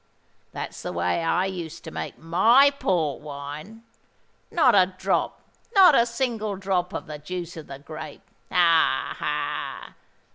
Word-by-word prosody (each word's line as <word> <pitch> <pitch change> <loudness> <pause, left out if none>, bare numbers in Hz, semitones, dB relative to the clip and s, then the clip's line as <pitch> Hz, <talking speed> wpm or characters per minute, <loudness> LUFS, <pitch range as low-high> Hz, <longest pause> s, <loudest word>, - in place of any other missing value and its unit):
That's - - -6
the - - -4
way 90 - -1
I 180 +3 +1
used 175 -4 -6
to 160 - -8
make - - -6
my 225 - +5
Port 170 - -1
wine. 150 +9 -8 0.7
Not 265 -8 +4
a 185 -1 +4
drop—not 385 - +2
a 235 -3 +4
single 230 -4 -2
drop 190 -2 -1
of - - -5
the 150 -3 -8
juice 175 +3 -6
of 160 -2 -9
the 135 - -8
grape. 155 +3 -9 0.3
Ha! 165 - +3
ha! - - -3
180 Hz, 140 wpm, -25 LUFS, 155-220 Hz, 0.7 s, my